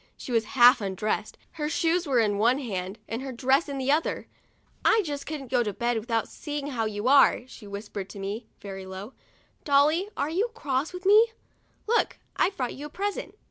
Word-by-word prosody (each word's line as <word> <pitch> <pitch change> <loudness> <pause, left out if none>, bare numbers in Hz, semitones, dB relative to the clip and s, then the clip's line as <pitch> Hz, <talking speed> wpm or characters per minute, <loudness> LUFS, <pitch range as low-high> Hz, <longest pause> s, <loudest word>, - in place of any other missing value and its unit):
She - - -8
was 230 -2 +2
half 245 0 +8
undressed, 205 +2 -2
her 300 -2 -3
shoes 335 +2 +1
were 265 -3 +2
in 205 -3 +1
one 240 +4 +4
hand, 195 -7 -4
and 230 +2 -4
her 265 0 -5
dress 265 +5 +2
in 280 - -4
the 265 +1 +1
other. 310 +3 0 0.3
" - - -37
I 440 - +4
just 285 -2 -5
couldn't 280 -5 -6
go 250 -2 +3
to 210 -3 -2
bed 235 +2 0
without 230 0 -1
see 295 -1 -6
ing 285 -1 -3
how 230 -4 -1
you 210 +1 -3
are," 275 +1 +6
she 245 -4 -12
whispered 200 -1 -6
to 200 - -9
me, 205 +4 -5
very 195 -1 -7
low. 190 +6 -8 0.3
" - - -37
Dolly, 305 +7 +3
are 295 - -1
you 405 +8 +1
cross 285 - -2
at 360 +1 -8
me? 440 +3 +6 0.5
Look, 470 +2 +1 0.2
I've 390 - +1
brought 250 -2 -2
you 290 +2 -7
a - - -15
present." 405 +5 -4
260 Hz, 215 wpm, -27 LUFS, 215-300 Hz, 0.5 s, half